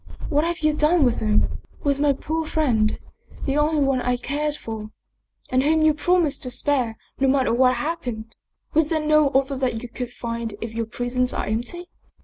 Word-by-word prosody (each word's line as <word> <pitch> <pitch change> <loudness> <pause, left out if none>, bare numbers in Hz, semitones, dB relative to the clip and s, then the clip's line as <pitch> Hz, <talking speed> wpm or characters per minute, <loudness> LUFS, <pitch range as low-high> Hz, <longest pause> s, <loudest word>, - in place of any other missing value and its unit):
What 295 +1 +2
have 340 -1 -2
you 305 -1 +3
done 305 +2 +3
with 240 -2 +1
him, 215 -1 +1 0.2
with 280 -2 +1
my 290 0 +4
poor 315 +4 -2
friend, 240 -10 +1 0.5
the 275 - 0
only 300 0 +2
one 270 -2 +1
I 250 0 0
cared 295 +4 -2
for 220 -5 -7 0.6
and 255 0 +2
whom 310 +3 +3
you 310 -1 +5
promised 340 -1 +1
to 250 - -2
spare, 250 -4 0 0.2
no 270 - +3
matter 265 -2 +2
what 255 +1 +4
happened? 240 -6 -4 0.4
Was 315 -1 +3
there 315 0 0
no 305 -1 +4
other 275 +1 +1
that 250 -3 -1
you - - -5
could 240 +1 -6
find 230 -2 -4
if 225 -1 -6
your 230 -1 -2
prisons 245 +2 0
are - - -2
empty? 240 +11 -3
270 Hz, 190 wpm, -23 LUFS, 240-300 Hz, 0.6 s, you